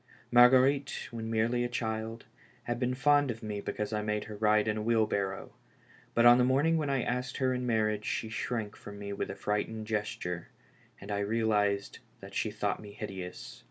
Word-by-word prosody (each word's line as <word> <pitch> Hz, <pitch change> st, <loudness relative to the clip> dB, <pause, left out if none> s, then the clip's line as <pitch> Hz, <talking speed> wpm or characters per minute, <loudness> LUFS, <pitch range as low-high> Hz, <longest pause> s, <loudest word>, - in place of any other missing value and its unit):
Mar 120 Hz, 0 st, +9 dB
guerite, 135 Hz, +2 st, +2 dB
when 115 Hz, -1 st, -5 dB
merely 115 Hz, +2 st, +1 dB
a 120 Hz, -, -1 dB
child, 110 Hz, -1 st, -3 dB, 0.4 s
had 120 Hz, +1 st, -3 dB
been 125 Hz, 0 st, 0 dB
fond 145 Hz, +1 st, +4 dB
of 115 Hz, -1 st, -5 dB
me 105 Hz, -1 st, -4 dB
because 105 Hz, +1 st, -3 dB
I 105 Hz, -, 0 dB
made 105 Hz, 0 st, -1 dB
her 110 Hz, -, -8 dB
ride 105 Hz, 0 st, +3 dB
in 105 Hz, 0 st, 0 dB
a -, -, -2 dB
wheelbarrow, 105 Hz, -3 st, 0 dB, 0.6 s
but 115 Hz, -, +4 dB
on 120 Hz, +1 st, +8 dB
the -, -, +5 dB
morning 140 Hz, +6 st, +3 dB
when 150 Hz, -3 st, -1 dB
I 135 Hz, -3 st, +1 dB
asked 125 Hz, 0 st, -2 dB
her 130 Hz, -1 st, +1 dB
in 125 Hz, 0 st, -2 dB
marriage^she 110 Hz, -1 st, 0 dB
shrank 115 Hz, -2 st, -3 dB
from 100 Hz, 0 st, -10 dB
mo 100 Hz, 0 st, -5 dB
with -, -, -3 dB
a -, -, -5 dB
frightened 110 Hz, +1 st, -2 dB
gesture, 105 Hz, -5 st, -3 dB, 0.5 s
and 100 Hz, +1 st, -8 dB
I 100 Hz, -, 0 dB
realized 105 Hz, -1 st, 0 dB, 0.2 s
that -, -, -11 dB
she -, -, 0 dB
thought -, -, -2 dB
me 105 Hz, -1 st, -10 dB
hideous. 95 Hz, -4 st, -7 dB
110 Hz, 195 wpm, -30 LUFS, 105-125 Hz, 0.6 s, Mar